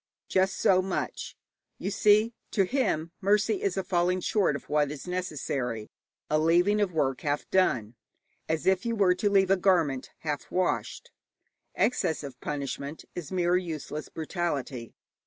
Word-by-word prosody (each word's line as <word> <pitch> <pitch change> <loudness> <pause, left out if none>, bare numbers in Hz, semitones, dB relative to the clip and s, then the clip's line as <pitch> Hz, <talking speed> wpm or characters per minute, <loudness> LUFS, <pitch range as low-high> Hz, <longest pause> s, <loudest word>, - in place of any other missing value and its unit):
Just 190 +1 +1
so 185 -1 +4
much. 185 0 -4 0.4
You 195 - -3
see, 215 +3 +4 0.2
to 200 - +2
him 185 - 0
mercy 210 +1 +2
is 195 -1 -1
a 190 - 0
falling 180 0 +1
short 190 -5 +1
of 140 - -7
what 150 -1 +2
is 150 +3 -7
necessary, 135 - -3 0.4
a 155 - +2
leaving 175 +6 +3
of 200 -3 +1
work 135 -5 0
half 145 -1 -1
done, 120 - +2 0.6
as 160 -2 -1
if 190 0 +3
you 230 -1 -1
were 195 -4 +4
to 205 +3 0
leave 195 -1 +3
a 195 - +5
garment 170 -8 +2
half 150 -2 -3
washed. 185 0 -1 0.6
Excess 175 -11 +1
of 135 -3 -9
punishment 140 +1 -4
is 175 -2 -7
mere 180 -1 +2
useless 155 -4 -5
brutality. 145 -8 -3
175 Hz, 155 wpm, -28 LUFS, 150-195 Hz, 0.6 s, a